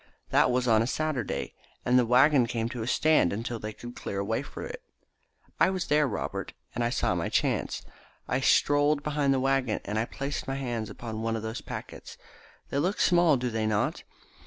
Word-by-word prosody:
That -, -, +4 dB
was 125 Hz, 0 st, +1 dB
on 110 Hz, -2 st, +5 dB
a 115 Hz, -, 0 dB
Saturday, 135 Hz, -, -2 dB, 0.3 s
and 125 Hz, +1 st, +5 dB
the 120 Hz, -, +2 dB
waggon 130 Hz, +1 st, +5 dB
came 115 Hz, -1 st, -2 dB
to 120 Hz, -1 st, -5 dB
a 110 Hz, -, -3 dB
stand 155 Hz, -, +3 dB
until 115 Hz, +3 st, -3 dB
they 110 Hz, 0 st, -5 dB
could 120 Hz, +3 st, -10 dB
clear 100 Hz, -, -5 dB
a 100 Hz, -, 0 dB
way 110 Hz, +4 st, 0 dB
for -, -, -8 dB
it. -, -, -7 dB, 0.8 s
I -, -, +5 dB
was 185 Hz, -3 st, -2 dB
there, 150 Hz, 0 st, +3 dB
Robert, 115 Hz, -, -4 dB, 0.2 s
and 120 Hz, -, -1 dB
I 120 Hz, -, +1 dB
saw -, -, +1 dB
my -, -, -1 dB
chance. -, -, 0 dB, 0.4 s
I 125 Hz, -, 0 dB
strolled 145 Hz, +2 st, +3 dB
behind 145 Hz, -2 st, +1 dB
the 135 Hz, -, +2 dB
waggon, 135 Hz, -4 st, +1 dB
and 105 Hz, +2 st, -1 dB
I 110 Hz, -, +1 dB
placed 140 Hz, +4 st, -4 dB
my 135 Hz, -, -2 dB
hands 120 Hz, -5 st, -3 dB
upon 110 Hz, -2 st, -6 dB
one 115 Hz, 0 st, -1 dB
of 110 Hz, -, -4 dB
those 110 Hz, +2 st, -4 dB
packets. -, -, -8 dB, 0.5 s
They 140 Hz, -, 0 dB
look 185 Hz, +7 st, 0 dB
small, 175 Hz, -5 st, +4 dB
do 125 Hz, -1 st, -2 dB
they 110 Hz, -1 st, -1 dB
not? 105 Hz, -1 st, 0 dB
125 Hz, 205 wpm, -28 LUFS, 115-145 Hz, 0.8 s, on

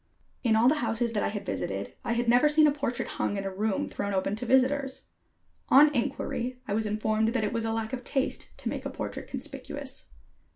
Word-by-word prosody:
In 225 Hz, -3 st, +3 dB
all 225 Hz, +2 st, +5 dB
the 300 Hz, +3 st, +4 dB
houses 230 Hz, 0 st, 0 dB
that 210 Hz, -, +1 dB
I -, -, +1 dB
had 205 Hz, -1 st, -4 dB
visited 100 Hz, 0 st, -3 dB
I 235 Hz, -, 0 dB
had 235 Hz, +1 st, 0 dB
never 245 Hz, +5 st, +5 dB
seen 305 Hz, +1 st, +5 dB
a 300 Hz, -, +5 dB
portrait 280 Hz, -4 st, -2 dB
hung 205 Hz, -, -2 dB
in 195 Hz, -, -2 dB
a 195 Hz, -1 st, -4 dB
room 205 Hz, +1 st, 0 dB
thrown 200 Hz, -1 st, -3 dB
open 190 Hz, +2 st, 0 dB
to 245 Hz, +2 st, -4 dB
visitors. 265 Hz, +2 st, +2 dB, 0.6 s
On 295 Hz, +2 st, +7 dB
inquiry, 250 Hz, 0 st, -2 dB
I 200 Hz, -, -1 dB
was 220 Hz, +1 st, +1 dB
informed 215 Hz, +1 st, +1 dB
that 230 Hz, -, +1 dB
it 210 Hz, -, -1 dB
was 230 Hz, -1 st, -1 dB
a 225 Hz, -, 0 dB
lack 225 Hz, +1 st, -2 dB
of 255 Hz, -1 st, -3 dB
taste 270 Hz, +2 st, -2 dB
to -, -, -4 dB
make -, -, -4 dB
a -, -, -3 dB
portrait -, -, -5 dB
conspicuous. -, -, -6 dB
230 Hz, 220 wpm, -28 LUFS, 215-260 Hz, 0.6 s, On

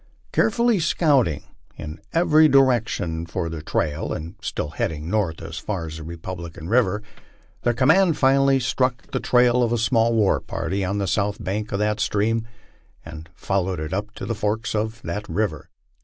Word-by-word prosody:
Carefully 235 Hz, -1 st, +2 dB
scouting 145 Hz, -, +2 dB, 0.3 s
in 75 Hz, +1 st, -7 dB
every 160 Hz, -2 st, +5 dB
direction 120 Hz, -, +2 dB
for 85 Hz, 0 st, -3 dB
the 80 Hz, -1 st, -5 dB
trail 75 Hz, -1 st, -2 dB
and 80 Hz, +2 st, -5 dB
still 75 Hz, -, -3 dB
heading 80 Hz, +2 st, -3 dB
north 100 Hz, -7 st, -1 dB
as 80 Hz, 0 st, -6 dB
far 95 Hz, -6 st, -3 dB
as 80 Hz, 0 st, -7 dB
the 80 Hz, -, -8 dB
Republican 85 Hz, 0 st, -7 dB
river, 105 Hz, -3 st, +2 dB, 0.6 s
the 120 Hz, -1 st, +1 dB
command 160 Hz, +7 st, +4 dB
finally 135 Hz, 0 st, +4 dB
struck 125 Hz, -1 st, -1 dB
the -, -, -1 dB
trail 125 Hz, 0 st, +3 dB
of 120 Hz, -1 st, +1 dB
a 120 Hz, -, +2 dB
small 115 Hz, 0 st, +2 dB
war 105 Hz, -3 st, +3 dB
party 90 Hz, +4 st, -3 dB
on 95 Hz, +2 st, -1 dB
the 100 Hz, -, 0 dB
south 100 Hz, +4 st, 0 dB
bank 105 Hz, +3 st, -3 dB
of 100 Hz, -, 0 dB
that 105 Hz, +1 st, 0 dB
stream, 110 Hz, +2 st, 0 dB, 0.6 s
and 80 Hz, -1 st, -9 dB
followed 95 Hz, -2 st, -1 dB
it 80 Hz, +3 st, -4 dB
up 105 Hz, +2 st, -2 dB
to -, -, -6 dB
the 115 Hz, -, -2 dB
forks 110 Hz, +1 st, -2 dB
of 110 Hz, +2 st, -2 dB
that 105 Hz, +1 st, -5 dB
river. 100 Hz, -9 st, -2 dB
105 Hz, 170 wpm, -23 LUFS, 85-125 Hz, 0.6 s, every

